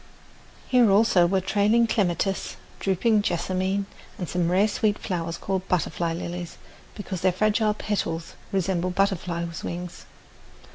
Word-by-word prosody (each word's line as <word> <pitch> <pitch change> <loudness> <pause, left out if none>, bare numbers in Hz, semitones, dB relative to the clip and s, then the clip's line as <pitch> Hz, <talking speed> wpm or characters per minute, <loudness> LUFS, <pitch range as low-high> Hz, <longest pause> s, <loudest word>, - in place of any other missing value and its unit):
Here, 245 -4 +5
also, 195 -3 +5
were 190 +1 +1
trailing 210 +4 +3
clematis, 195 -3 0 0.2
drooping 205 +3 +2
jessamine, 190 +1 -1 0.3
and 180 - -4
some 175 0 0
rare 195 +4 +4
sweet 210 0 0
flowers 170 -3 -3
called 190 0 -3
butterfly 170 -1 0
lilies, 175 0 -5 0.4
because 195 -4 -5
their 185 - +4
fragile 210 +3 +2
petals 165 -7 -3 0.2
resemble 185 -2 0
butterflies' 175 -3 -1
wings. 175 0 -6
190 Hz, 125 wpm, -25 LUFS, 175-205 Hz, 0.4 s, Here